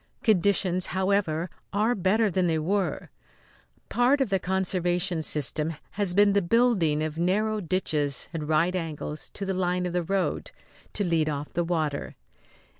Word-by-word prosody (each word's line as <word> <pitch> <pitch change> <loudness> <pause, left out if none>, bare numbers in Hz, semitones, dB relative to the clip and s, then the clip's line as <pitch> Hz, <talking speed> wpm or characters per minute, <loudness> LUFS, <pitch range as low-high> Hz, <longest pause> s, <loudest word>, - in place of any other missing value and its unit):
Conditions, 185 -3 +2
however, 185 -4 +1 0.2
are 215 +4 +2
better 205 +2 +2
than 180 0 +1
they 160 -1 +1
were. 185 +4 -1 0.8
Part 250 +4 +3
of 260 -7 0
the 195 - +2
conservation 180 -2 0
system 155 +1 0 0.2
has 200 -3 -1
been 205 0 +5
the 200 - +3
building 180 -7 +2
of 155 +1 -4
narrow 210 +5 +1
ditches 155 -6 -1
at 160 -2 -3
right 165 +4 +2
angles 155 -3 -4
to 200 - -4
the 190 - -1
line 180 -1 0
of 175 - -3
the 180 - +1
road, 190 +2 -1 0.4
to 205 - 0
lead 165 -4 +1
off 145 0 -5
the 175 - 0
water. 155 -4 -2
180 Hz, 155 wpm, -26 LUFS, 160-200 Hz, 0.8 s, been